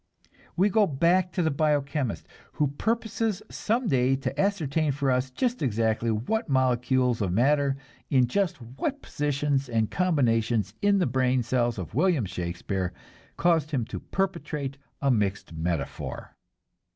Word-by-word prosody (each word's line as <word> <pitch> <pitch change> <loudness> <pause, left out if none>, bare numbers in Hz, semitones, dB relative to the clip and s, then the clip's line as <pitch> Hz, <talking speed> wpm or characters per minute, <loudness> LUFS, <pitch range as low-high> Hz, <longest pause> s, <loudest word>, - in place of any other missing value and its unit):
We 195 +4 +4
go 210 0 +4
back 170 +5 +2
to 180 - 0
the 160 - +2
bio 150 +1 +2
chemist, 140 -5 -3 0.3
who 150 -2 +1
purposes 220 +4 -1
some 230 +3 -1
day 130 -2 +3
to 135 +1 -2
ascertain 160 -7 +1
for 140 -1 0
us 125 +1 +1
just 245 - -1
exactly 115 -2 +1
what 130 - -1
molecules 125 -2 +2
of 95 -3 0
matter 140 +6 +2 0.3
in 130 -3 +4
just 185 +6 0
what 135 - -4
positions 145 -2 -1
and 110 -2 0
combinations 115 - +1
in 205 0 +4
the 185 - +2
brain 130 0 +1
cells 120 -1 0
of 90 -3 -6
William 155 - +2
Shakespeare 90 +1 -3 0.4
caused 165 -4 +2
him 130 -7 -1
to - - -6
perpetrate 150 -7 -3 0.3
a 140 - +4
mixed 100 -6 -1
metaphor. 80 -2 -4
135 Hz, 145 wpm, -27 LUFS, 120-165 Hz, 0.4 s, We